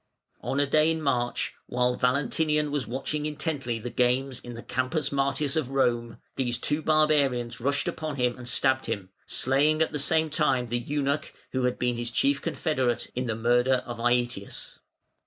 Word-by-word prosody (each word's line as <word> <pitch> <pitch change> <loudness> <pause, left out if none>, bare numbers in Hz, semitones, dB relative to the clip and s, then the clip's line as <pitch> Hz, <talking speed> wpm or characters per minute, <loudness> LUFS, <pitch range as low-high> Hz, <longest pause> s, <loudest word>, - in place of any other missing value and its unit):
On 135 - -1
a 145 - +4
day 155 +3 +3
in 160 0 0
March, 125 -5 0
while 125 0 +1
Valentinian 150 +4 +1
was 145 -5 -2
watching 150 +4 -2
intently 150 -6 -2
the 120 +2 -6
games 125 +1 +1
in 120 -1 -9
the 115 - -8
Campus 130 +4 -1
Martius 140 +1 0
of 155 -5 0
Rome, 120 -4 0 0.2
these 120 -3 0
two 150 +5 -1
barbarians 145 -7 +2
rushed 140 +3 +1
upon 155 -2 -3
him 125 -2 +1
and 120 -1 -7
stabbed 130 0 +2
him, 100 -5 -3 0.2
slaying 145 +4 +2
at 160 - +2
the 150 - -2
same 160 +2 +2
time 135 -5 +2
the 120 +1 0
eunuch, 140 +3 -2 0.2
who 130 -1 0
had 125 - 0
been 125 -1 0
his 120 0 -2
chief 140 +4 +1
confederate 150 -7 -1
in 125 0 -2
the 110 - -1
murder 120 +3 +2
of 120 -1 -6
Aëtius. 120 -3 -1
130 Hz, 175 wpm, -27 LUFS, 120-150 Hz, 0.2 s, a